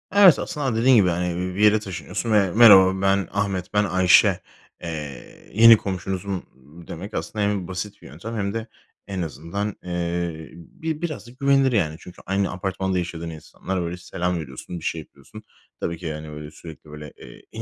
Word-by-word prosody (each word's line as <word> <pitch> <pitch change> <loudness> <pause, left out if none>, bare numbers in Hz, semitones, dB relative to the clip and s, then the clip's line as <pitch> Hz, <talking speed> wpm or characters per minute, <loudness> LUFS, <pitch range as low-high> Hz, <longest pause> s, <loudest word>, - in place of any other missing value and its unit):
Evet, 200 -4 +8
aslında 145 -8 -2
dediğin 130 +2 +6
gibi, 100 -5 +5
yani, 90 0 -1
bi - - -9
bir 105 - +1
yere 105 0 +6
taşınıyorsun 105 +3 -5
ve: 100 -4 +3
"Merhaba, 95 -3 +7
ben 95 -1 +2
Ahmet, 95 -1 -2
ben 105 - +3
Ayşe, 95 -1 +4 0.4
eee, 75 -6 -8
yeni 115 +2 +8
komşunuzum." 95 0 -4 0.4
demek 100 +6 -8
aslında 105 -1 -2
hem 100 -3 -1
basit 95 +2 -6
bir - - -12
yöntem 90 - -8
hem 100 -1 -2
de 115 0 -4 0.4
en 95 -2 -4
azından, 85 +7 -4
eee, 85 -2 -3
bi 155 - -6
biraz 155 -8 -4
da - - -12
güvenilir, 140 -1 +3
yani. 85 -9 +1
Çünkü 90 - -13
aynı 95 +1 0
apartmanda 95 0 -2
yaşadığın 85 -2 -4
insanlar 85 +4 -5
böyle 85 +1 -4
selam 90 0 -3
veriyorsun, 75 +4 -8
bir - - -14
şey 80 - -2
yapıyorsun. - - -15 0.4
Tabii 85 - -3
ki, 90 - -11
yani, 75 -1 -5
böyle, 75 0 -8
sürekli, 80 -2 -12
böyle, 75 -1 -9
eee, - - -13
en - - -7
95 Hz, 180 wpm, -23 LUFS, 85-105 Hz, 0.4 s, Evet